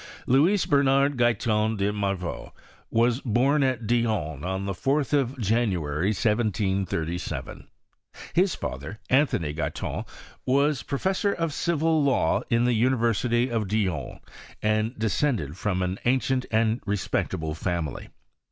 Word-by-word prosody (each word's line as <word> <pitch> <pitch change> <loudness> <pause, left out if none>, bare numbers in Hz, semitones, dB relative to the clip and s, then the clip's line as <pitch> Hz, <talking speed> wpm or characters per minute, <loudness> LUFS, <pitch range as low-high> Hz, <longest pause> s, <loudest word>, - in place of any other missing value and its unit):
Louis 165 +10 +3
Bernard 140 0 +3
Guyton 110 -2 +1
de 100 +1 0
Morveau 100 -4 -3 0.4
ivas 120 +3 +2
bom 135 +5 +2
al 130 -1 +2
Dijon 105 - 0
on 95 +2 -2
the 100 - -2
4th 140 +9 0
of 135 -2 +1
January, 95 - 0
1737. 100 -6 -1 0.7
Hia 185 +3 +4
father, 80 - -5
Anthony 125 - +2
Guyton, 75 -2 -3 0.4
was 140 0 +2
professor 190 - 0
of 165 -3 -2
civil 160 -1 +1
law 130 -12 +2
in 115 0 +3
tha 125 - +3
University 120 0 +1
of 110 -3 -1
Dijon, 100 -3 -2 0.4
and 110 +3 0
descended 110 - 0
from 95 -1 -1
an 90 +2 -2
ancient 130 +1 +1
and 110 +1 +2
respectable 85 -5 -1
family. 85 -3 -3
115 Hz, 120 wpm, -26 LUFS, 95-135 Hz, 0.7 s, Hia